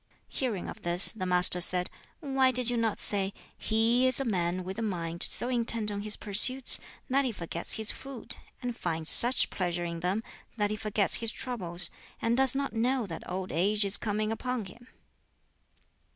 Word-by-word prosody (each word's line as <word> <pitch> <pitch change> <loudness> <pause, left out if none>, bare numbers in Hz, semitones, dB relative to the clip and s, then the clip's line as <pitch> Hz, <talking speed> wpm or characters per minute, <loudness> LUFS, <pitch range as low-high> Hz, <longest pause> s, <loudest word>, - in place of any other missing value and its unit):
Hearing 235 -9 -4
of - - -10
this, 175 +2 +6
the 185 -5 -6
Master 180 0 +3
said, 180 +1 -1 0.3
"Why 270 -3 +1
did 250 -1 +1
you - - -2
not 225 -2 -1
say, 200 -1 +1 0.2
He 230 +3 +1
is 255 0 +7
a 270 - -3
man 180 -4 -2
with 190 +4 -7
a - - -4
mind 170 -5 -5
so 240 - +3
intent 230 -3 +1
on 200 0 -5
his 210 0 -2
pursuits 245 +6 +3 0.3
that 275 +1 +1
he 255 - -2
forgets 170 -4 +2
his 220 -1 -1
food, 270 -4 -5 0.3
and 245 -1 -4
finds 165 -4 0
such 245 +2 +5
pleasure 175 -2 -3
in 170 -1 -6
them 185 +6 -3 0.3
that 205 -1 -1
he - - -2
forgets 210 -2 +2
his 230 -1 -1
troubles, 180 -9 -1 0.3
and 230 +1 -1
does 265 0 +3
not 275 0 -3
know 245 +2 -1
that 165 -5 -9
old 185 +1 -5
age 205 +5 0
is 200 0 +1
coming 215 0 -3
upon 250 0 -4
him?" 240 +6 -15
215 Hz, 185 wpm, -28 LUFS, 180-245 Hz, 0.3 s, is